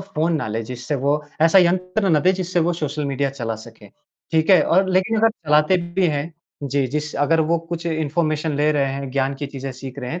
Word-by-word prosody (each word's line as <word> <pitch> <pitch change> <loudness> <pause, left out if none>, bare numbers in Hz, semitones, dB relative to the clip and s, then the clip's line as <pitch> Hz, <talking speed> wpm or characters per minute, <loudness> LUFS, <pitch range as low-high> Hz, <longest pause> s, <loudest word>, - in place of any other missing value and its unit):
Phone 170 -3 -1
ना 150 - -3
लें, 115 +2 -3
जिससे 125 +4 -5
वो 145 +2 0 0.2
ऐसा 165 +4 +6
यंत्र 185 +3 +1
ना 155 -3 +3
दें 185 - +4
जिससे 180 -1 -1
वो 175 - +1
सोशल 150 -2 -3
मीडिया 140 0 -1
चला 120 -4 -4
सके, - - -15 0.4
ठीक 160 +3 +2
है? 180 -5 +7
और 190 +3 +2
लेकिन 190 +5 +1
अगर 225 +1 +5
चलाते 155 -2 +2 0.2
भी 190 - +4
हैं 155 +1 -2 0.3
जी, 140 -1 0
जिस 150 +3 -4
अगर 155 +3 +2
वो 170 - +3
कुछ 170 0 -4
इन्फॉर्मेशन 155 0 -1
ले 150 +1 +2
रहे 140 -2 0
हैं, 135 -1 -5
ज्ञान 135 +1 0
की 145 +1 -5
चीज़ें 135 -1 -6
सीख 130 +1 -9
रहे 125 -1 -5
हैं 170 +3 -4
150 Hz, 225 wpm, -21 LUFS, 140-170 Hz, 0.4 s, है